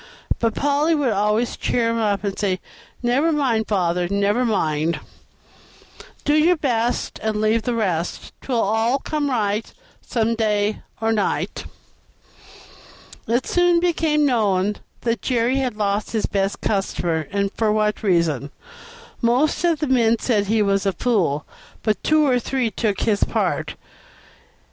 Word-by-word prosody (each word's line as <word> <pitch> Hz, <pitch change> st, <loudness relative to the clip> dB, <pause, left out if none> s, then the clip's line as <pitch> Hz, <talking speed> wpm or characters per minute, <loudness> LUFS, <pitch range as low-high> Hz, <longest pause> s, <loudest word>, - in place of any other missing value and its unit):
But 230 Hz, -1 st, 0 dB
Polly 290 Hz, +3 st, +2 dB
would 280 Hz, -5 st, +1 dB
always 210 Hz, +4 st, +1 dB
cheer 230 Hz, -2 st, 0 dB
him 230 Hz, -, -1 dB
up, 205 Hz, -2 st, 0 dB
and 200 Hz, -2 st, -2 dB
say, 190 Hz, -3 st, 0 dB, 0.4 s
"Never 270 Hz, +7 st, +2 dB
mind, 250 Hz, -8 st, +1 dB
father, 180 Hz, -3 st, 0 dB
never, 200 Hz, +4 st, +1 dB
mind. 165 Hz, -8 st, 0 dB, 1.3 s
"'Do 295 Hz, -, +3 dB
your 315 Hz, +4 st, +4 dB
best, 240 Hz, -6 st, -1 dB
And 215 Hz, -1 st, -1 dB
leave 215 Hz, +1 st, +2 dB
the 240 Hz, +2 st, -2 dB
rest, 180 Hz, -7 st, -2 dB
'Twill 250 Hz, -3 st, -1 dB
all 225 Hz, +5 st, +2 dB
come 290 Hz, +1 st, -2 dB
right 215 Hz, -3 st, -1 dB, 0.3 s
Some 230 Hz, -1 st, 0 dB
day 215 Hz, -2 st, 0 dB, 0.2 s
or 225 Hz, 0 st, +1 dB
night.'" 210 Hz, -3 st, -1 dB, 1.6 s
It 240 Hz, +3 st, +1 dB
soon 355 Hz, -1 st, +3 dB
became 320 Hz, -3 st, +1 dB
known 210 Hz, -6 st, +1 dB, 0.2 s
that 230 Hz, -1 st, -1 dB
Jerry 245 Hz, +1 st, +1 dB
had 255 Hz, -5 st, -1 dB
lost 205 Hz, +1 st, -1 dB
his 220 Hz, -, 0 dB
best 195 Hz, 0 st, -1 dB
customer, 175 Hz, -5 st, -1 dB
and 200 Hz, -1 st, 0 dB
for 220 Hz, -2 st, +1 dB
what 210 Hz, 0 st, 0 dB
reason. 170 Hz, -, +1 dB, 0.7 s
Most 250 Hz, +8 st, +2 dB
of 340 Hz, -2 st, +3 dB
the 300 Hz, -, 0 dB
men 235 Hz, -3 st, +3 dB
said 210 Hz, -4 st, 0 dB
he 220 Hz, +1 st, +2 dB
was 195 Hz, 0 st, +1 dB
a 195 Hz, -, +1 dB
fool, 175 Hz, -, 0 dB, 0.4 s
but 215 Hz, -4 st, 0 dB
two 310 Hz, 0 st, +3 dB
or 255 Hz, -3 st, +3 dB
three 245 Hz, -1 st, -1 dB
took 205 Hz, 0 st, -1 dB
his 205 Hz, -2 st, +1 dB
part. -, -, -1 dB
220 Hz, 145 wpm, -21 LUFS, 200-250 Hz, 1.6 s, your